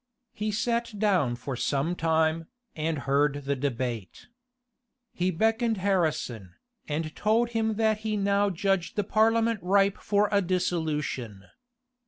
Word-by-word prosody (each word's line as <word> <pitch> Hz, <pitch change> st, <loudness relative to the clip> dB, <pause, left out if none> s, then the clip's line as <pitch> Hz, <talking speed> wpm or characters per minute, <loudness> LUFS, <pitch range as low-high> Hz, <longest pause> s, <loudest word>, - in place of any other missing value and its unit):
He 215 Hz, +1 st, -3 dB
sat 230 Hz, +1 st, -1 dB
down 185 Hz, -, +2 dB
for 130 Hz, +2 st, -5 dB
some 140 Hz, +6 st, 0 dB
time, 160 Hz, 0 st, +1 dB, 0.3 s
and 155 Hz, 0 st, -1 dB
heard 145 Hz, +1 st, +1 dB
the 140 Hz, 0 st, 0 dB
debate. 125 Hz, -, -4 dB, 0.8 s
He 180 Hz, +1 st, 0 dB
beckoned 225 Hz, +5 st, +1 dB
Harrison, 155 Hz, -, -1 dB, 0.3 s
and 155 Hz, +1 st, -3 dB
told 225 Hz, +3 st, +2 dB
him 220 Hz, -2 st, 0 dB
that 220 Hz, -1 st, +1 dB
he 215 Hz, -1 st, -2 dB
now 200 Hz, 0 st, +2 dB
judged 195 Hz, 0 st, -1 dB
the 205 Hz, -, +1 dB
parliament 225 Hz, +2 st, +2 dB
ripe 195 Hz, +2 st, +2 dB
for 205 Hz, 0 st, +2 dB
a 200 Hz, -1 st, +3 dB
dissolution. 155 Hz, -, -2 dB
185 Hz, 130 wpm, -27 LUFS, 150-215 Hz, 0.8 s, a